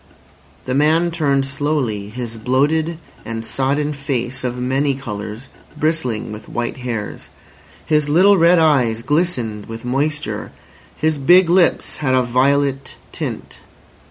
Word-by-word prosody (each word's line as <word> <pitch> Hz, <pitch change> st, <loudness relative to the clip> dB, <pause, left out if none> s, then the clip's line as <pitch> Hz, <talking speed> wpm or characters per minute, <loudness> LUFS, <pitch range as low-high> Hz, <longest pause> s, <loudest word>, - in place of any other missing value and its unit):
The 130 Hz, -, -2 dB
man 160 Hz, +5 st, +3 dB
turned 140 Hz, -5 st, +1 dB
slowly 135 Hz, -7 st, -2 dB
his 115 Hz, 0 st, -6 dB
bloated 145 Hz, +8 st, +1 dB, 0.3 s
and 115 Hz, 0 st, -5 dB
sodden 145 Hz, +4 st, 0 dB
face 135 Hz, -2 st, -3 dB
of 125 Hz, -1 st, -2 dB
many 135 Hz, +3 st, 0 dB
colours 110 Hz, -1 st, -7 dB, 0.3 s
bristling 145 Hz, -10 st, -1 dB
with 105 Hz, 0 st, -9 dB
white 120 Hz, +2 st, -3 dB
hairs. 120 Hz, -5 st, -5 dB, 0.6 s
His 150 Hz, -2 st, +1 dB
little 190 Hz, +7 st, +6 dB
red 170 Hz, +2 st, +5 dB
eyes 130 Hz, -8 st, +2 dB
glistened 125 Hz, -, -1 dB
with 115 Hz, +1 st, -8 dB
moisture. 145 Hz, +4 st, -2 dB, 0.5 s
His 155 Hz, -1 st, 0 dB
big 175 Hz, +5 st, +5 dB
lips 180 Hz, -1 st, +2 dB
had 130 Hz, -3 st, +1 dB
a 130 Hz, -, +3 dB
violet 135 Hz, +2 st, +1 dB, 0.2 s
tint. -, -, -6 dB
135 Hz, 130 wpm, -19 LUFS, 120-155 Hz, 0.6 s, little